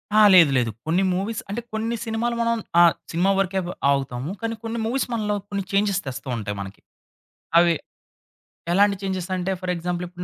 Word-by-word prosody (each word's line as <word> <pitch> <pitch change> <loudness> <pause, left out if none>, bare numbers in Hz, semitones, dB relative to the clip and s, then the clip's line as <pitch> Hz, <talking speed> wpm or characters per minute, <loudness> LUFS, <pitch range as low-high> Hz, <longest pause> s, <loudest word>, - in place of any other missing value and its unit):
ఆ! - - +6 0.2
లేదు 165 -6 +7
లేదు. 120 -3 +1 0.2
కొన్ని 180 +4 +2
మూవీస్ 200 +4 -2
అంటే 215 +4 -3
కొన్ని 225 +2 -1
సినిమాలు 230 +2 -1
మనం 230 0 +1 0.2
ఆహ్, 170 -1 +7 0.2
సినిమా 180 +4 +2
వరకే 190 0 0 0.3
ఆగుతాము. 135 +1 -2
కానీ 230 0 -2
కొన్ని 230 +1 -3
మూవీస్ 255 +4 -1
మనలో 210 -2 0
కొన్ని 200 -1 -2
చేంజెస్ 200 -1 +1
తెస్తూ 135 +1 -6
ఉంటాయి 105 -1 -4
మనకి. 95 0 -9 0.8
అవి 170 0 +5 1.0
ఎలాంటి 200 +2 +4
చేంజెసంటే 185 -1 -2
ఫర్ 185 -1 -2
ఎగ్జాంపుల్ 175 +1 -3
ఇప్పుడు 180 0 -8
190 Hz, 165 wpm, -23 LUFS, 170-215 Hz, 1.0 s, లేదు